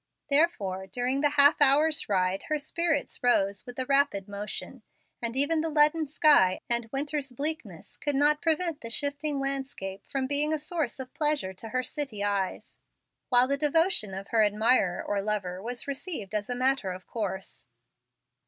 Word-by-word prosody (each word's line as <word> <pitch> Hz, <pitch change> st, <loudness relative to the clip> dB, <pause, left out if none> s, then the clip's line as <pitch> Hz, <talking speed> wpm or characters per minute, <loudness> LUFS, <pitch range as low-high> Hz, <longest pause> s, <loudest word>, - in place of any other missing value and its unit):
Therefore 200 Hz, -, +1 dB
during 250 Hz, +7 st, -1 dB
the 295 Hz, -, +3 dB
half 285 Hz, +1 st, +5 dB
hour's 300 Hz, +2 st, +5 dB
ride 185 Hz, -1 st, 0 dB
her 305 Hz, -, +1 dB
spirits 315 Hz, 0 st, -1 dB
rose 200 Hz, -5 st, +1 dB
with 245 Hz, -, -8 dB
the 260 Hz, -, -2 dB
rapid 275 Hz, -8 st, +2 dB
motion, 205 Hz, +5 st, -6 dB, 0.4 s
and 235 Hz, +1 st, -3 dB
even 310 Hz, +3 st, +2 dB
the 325 Hz, -, -2 dB
leaden 305 Hz, +1 st, +3 dB
sky 285 Hz, -, +4 dB
and 235 Hz, -1 st, 0 dB
winter's 285 Hz, 0 st, -2 dB
bleakness 250 Hz, -, -5 dB
could 290 Hz, -2 st, -1 dB
not 295 Hz, +2 st, +3 dB
prevent 330 Hz, -1 st, -1 dB
the 230 Hz, -, -7 dB
shifting 285 Hz, +3 st, 0 dB
landscape 270 Hz, -8 st, -4 dB
from 270 Hz, -1 st, -2 dB
being 290 Hz, +3 st, +1 dB
a -, -, +1 dB
source 305 Hz, -4 st, -2 dB
of 260 Hz, -1 st, -8 dB
pleasure 295 Hz, -11 st, 0 dB
to 220 Hz, +4 st, -8 dB
her 255 Hz, +2 st, -1 dB
city 250 Hz, -8 st, -4 dB
eyes, 200 Hz, -2 st, -3 dB, 0.5 s
while 245 Hz, 0 st, +5 dB
the 280 Hz, +1 st, 0 dB
devotion 300 Hz, -, +1 dB
of 195 Hz, +1 st, -8 dB
her 225 Hz, -2 st, +3 dB
admirer 210 Hz, -3 st, +2 dB
or 205 Hz, -1 st, -2 dB
lover 195 Hz, -3 st, -3 dB
was 240 Hz, +5 st, -5 dB
received 275 Hz, -, -5 dB
as 210 Hz, +1 st, -2 dB
a 245 Hz, -, -1 dB
matter 255 Hz, -5 st, +1 dB
of 185 Hz, 0 st, -9 dB
course. 195 Hz, -4 st, -5 dB
265 Hz, 170 wpm, -27 LUFS, 205-295 Hz, 0.5 s, half